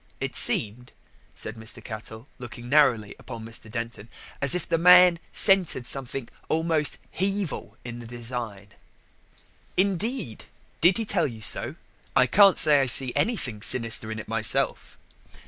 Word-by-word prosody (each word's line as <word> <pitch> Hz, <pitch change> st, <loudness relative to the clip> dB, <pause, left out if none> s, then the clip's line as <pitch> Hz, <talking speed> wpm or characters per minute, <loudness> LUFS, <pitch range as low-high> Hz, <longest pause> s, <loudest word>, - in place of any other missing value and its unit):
It -, -, -4 dB
seemed," 115 Hz, +4 st, 0 dB, 0.4 s
said 110 Hz, -, -5 dB
Mr. 110 Hz, 0 st, -5 dB
Cattell, 110 Hz, +2 st, -8 dB
looking 120 Hz, -1 st, -9 dB
narrowly 120 Hz, -7 st, +2 dB
upon 115 Hz, -3 st, -9 dB
Mr. 115 Hz, -1 st, -8 dB
Denton, 115 Hz, -2 st, -6 dB, 0.3 s
"as 140 Hz, +2 st, +2 dB
if 180 Hz, -, -3 dB
the 165 Hz, -, 0 dB
man 180 Hz, 0 st, +7 dB
scented 190 Hz, -, +3 dB
something 135 Hz, -2 st, -3 dB, 0.2 s
almost 160 Hz, -2 st, 0 dB
Hevil 195 Hz, -3 st, -3 dB
in 120 Hz, -1 st, -7 dB
the 120 Hz, -, -10 dB
design." 115 Hz, -4 st, -6 dB, 1.1 s
"Indeed? 195 Hz, -, -1 dB, 0.4 s
did 175 Hz, +4 st, +5 dB
he 225 Hz, -, -2 dB
tell 185 Hz, -6 st, 0 dB
you 115 Hz, -4 st, -9 dB
so? -, -, 0 dB, 0.4 s
I 130 Hz, -, +5 dB
can't 195 Hz, +8 st, +5 dB
say 150 Hz, -2 st, +4 dB
I 135 Hz, -, 0 dB
see 125 Hz, 0 st, +4 dB
anything 130 Hz, -, -1 dB
sinister 115 Hz, -1 st, +1 dB
in 110 Hz, -, -5 dB
it 110 Hz, -, -8 dB
myself." 110 Hz, -1 st, 0 dB
125 Hz, 145 wpm, -25 LUFS, 115-170 Hz, 1.1 s, man